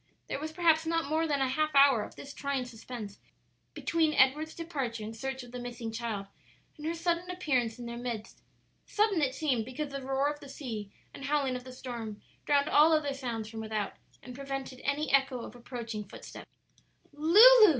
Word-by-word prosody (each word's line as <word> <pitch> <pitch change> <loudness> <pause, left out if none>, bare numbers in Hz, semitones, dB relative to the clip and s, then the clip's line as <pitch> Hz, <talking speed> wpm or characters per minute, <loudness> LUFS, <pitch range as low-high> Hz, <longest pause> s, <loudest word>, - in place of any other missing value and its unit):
'" - - -43
There - - -2
was 310 +1 -4
perhaps 320 -1 +3
not 330 0 +1
more 315 +3 +1
than 285 -3 +1
a 265 - +3
half 305 +3 0
hour 275 -5 +7
of - - -7
this 280 - -9
trying 280 -3 -2
suspense 225 -3 -8 0.6
between 320 -2 +1
Edward's 300 +5 +3
departure 270 -10 -3
in 220 +1 -5
search 265 +3 -4
of 245 - -12
the 250 - -6
missing 240 -2 -5
child 220 -3 -3 0.5
and 305 -1 -6
her 335 - -1
sudden 340 +1 0
appearance 260 -11 0
in 240 - -7
their 235 0 -5
midst: 235 -3 -5 0.5
sudden 415 -5 +2
it 260 -2 +1
seemed 265 -8 +1
because 280 +5 -5
the 275 0 -4
roar 270 +1 +1
of 295 0 -2
the 280 - -11
sea 225 -8 -5 0.2
and 275 - -7
howling 275 -2 +1
of 250 0 -6
the 255 - -8
storm 235 -4 -6 0.3
drowned 285 0 +4
all 310 +2 +6
other 295 -3 +2
sounds 240 -5 -4
from 220 0 -7
without, 215 -2 -2 0.3
and 250 - -8
prevented 270 -1 -5
any 290 +1 0
echo 270 -2 +3
of - - -9
approaching 235 -3 -5
footsteps. 195 - -11 0.6
"Lulu!" 425 +9 +9
270 Hz, 195 wpm, -31 LUFS, 240-305 Hz, 0.6 s, Lulu